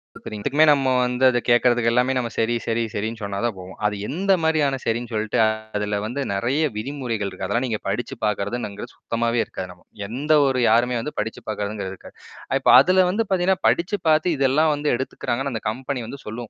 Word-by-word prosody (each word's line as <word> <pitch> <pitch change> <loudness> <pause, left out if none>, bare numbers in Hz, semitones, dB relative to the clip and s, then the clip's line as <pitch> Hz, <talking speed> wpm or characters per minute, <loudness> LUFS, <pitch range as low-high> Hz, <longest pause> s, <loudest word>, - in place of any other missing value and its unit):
பாக்குறீங் 105 -1 -8
இதுக்குமே 145 +3 +4
நம்ம 135 -3 +2
வந்து 125 +1 -1
அத 120 - +1
கேட்கறதுக்கு 120 -1 +4
எல்லாமே 125 +2 +2 0.2
சரி 115 +1 +1
சரி 115 0 0
சரின்னு 110 +2 -3
சொன்னா 100 -1 -4
தான் 120 - 0
போகும். 90 +1 -10
அது 105 0 +1
எந்த 195 +5 -1
மாரியான 155 -4 +2
சரின் 115 +2 -1
சொல்ட்டு 110 -1 -1 0.4
அதில 105 0 -1
வந்து 125 +6 -3
நெறைய 120 +10 0
விதிமுறைகள் 115 -4 -3
இருக்கு. - - -6
அதெல்லாம் 120 +2 0
நீங்க 110 -3 -2
படிச்சு 105 +5 -3
பார்க்குறதுங்குறது 105 0 -3
சுத்தமாவே 115 0 -1
இருக்காது 95 - -7
நமக்கு. 90 0 -20 0.2
எந்த 135 +8 -3 0.2
ஒரு 130 -1 0
யாருமே 120 +2 +3
வந்து 150 - -5
படிச்சுப் 110 +1 -4
பார்க்கதவங்க 105 -1 -3
இருக்காது. 95 - -13 0.4
இப்ப - - +1
அதில 185 +6 +4
வந்து 210 +5 +1
பார்த்தீங்கன்னா, 190 0 +2
படிச்சு 180 +4 +1
பார்த்து 155 +2 +3
இதெல்லாம் 140 +4 +3
வந்து 145 0 -1
எடுத்துக்குறாங்கனா. 130 +1 -3
அந்த 110 - -4
கம்பெனி 130 +3 -4
வந்து 140 +4 -8
சொல்லும் 115 +1 -6
120 Hz, 180 wpm, -22 LUFS, 110-140 Hz, 0.4 s, இதுக்குமே